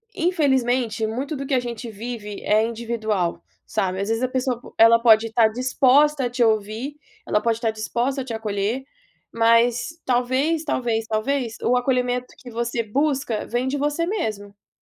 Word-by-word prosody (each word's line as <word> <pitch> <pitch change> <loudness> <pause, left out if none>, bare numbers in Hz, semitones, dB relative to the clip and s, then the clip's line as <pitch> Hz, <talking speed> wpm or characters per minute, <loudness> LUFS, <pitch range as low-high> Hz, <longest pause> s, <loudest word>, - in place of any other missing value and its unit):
infelizmente 255 - +1
muito 270 +7 -3
do 275 - -5
que 275 - -2
a - - +3
gente 240 -1 -6
vive 215 -1 -6
é 215 +1 +3
individual, 220 -6 -2 0.2
sabe, 190 0 -1
às 200 - -3
vezes, 225 +2 0
a - - +3
pessoa 255 -1 -1
po - - -15
ela 230 +1 +7
pode 225 -1 +5
estar 225 0 +4
disposta 260 +4 +3
a 245 - -1
te 245 0 +1
ouvir, 220 +6 -1 0.3
ela - - +2
pode 230 -1 +1
estar 225 -2 0
disposta 240 +5 -2
a - - -6
te 240 - -5
acolher, 220 +3 -2 0.5
mas, 230 +6 +2
talvez, 260 +6 +1
talvez, 230 -5 -1
talvez, 230 +1 -1
o 250 +1 +3
acolhimento 250 -1 0
que 245 -2 -11
você 235 0 -2
busca 270 0 -1
vem 245 +3 -1
de 285 - -1
você 295 +4 0
mesmo. 210 - -5
240 Hz, 170 wpm, -23 LUFS, 220-265 Hz, 0.5 s, ela